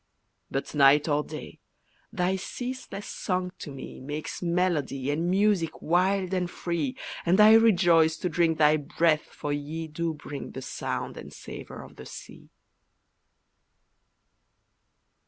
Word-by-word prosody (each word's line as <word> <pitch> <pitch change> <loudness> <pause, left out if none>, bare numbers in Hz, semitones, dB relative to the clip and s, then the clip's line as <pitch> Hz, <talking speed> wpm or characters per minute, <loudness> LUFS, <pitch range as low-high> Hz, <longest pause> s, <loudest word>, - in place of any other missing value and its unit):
But, 135 - -3
night 145 +1 +5
or 150 -1 +2
day, 155 0 -9 0.5
thy 180 +1 0
ceaseless 245 +1 -6
song 180 -1 -2
to - - -7
me 135 -1 -8
Makes 150 +3 -5
melody, 170 -6 0
and 165 +4 0
music 195 -3 +2
wild 185 +2 +1
and 180 -2 0
free, 165 -7 -3 0.3
And 180 +4 +3
I 215 +1 +9
rejoice 175 -8 +5
to 180 - -2
drink 165 -1 +2
thy 155 0 +5
breath 155 +1 +1
for 145 - -5
ye 155 +3 -4
Do 160 +1 -3
bring 145 -1 -8
the 130 - -6
sound 130 - -4
and - - -9
savour - - -9
of - - -15
the - - -10
sea. - - -11
165 Hz, 135 wpm, -27 LUFS, 150-185 Hz, 0.5 s, I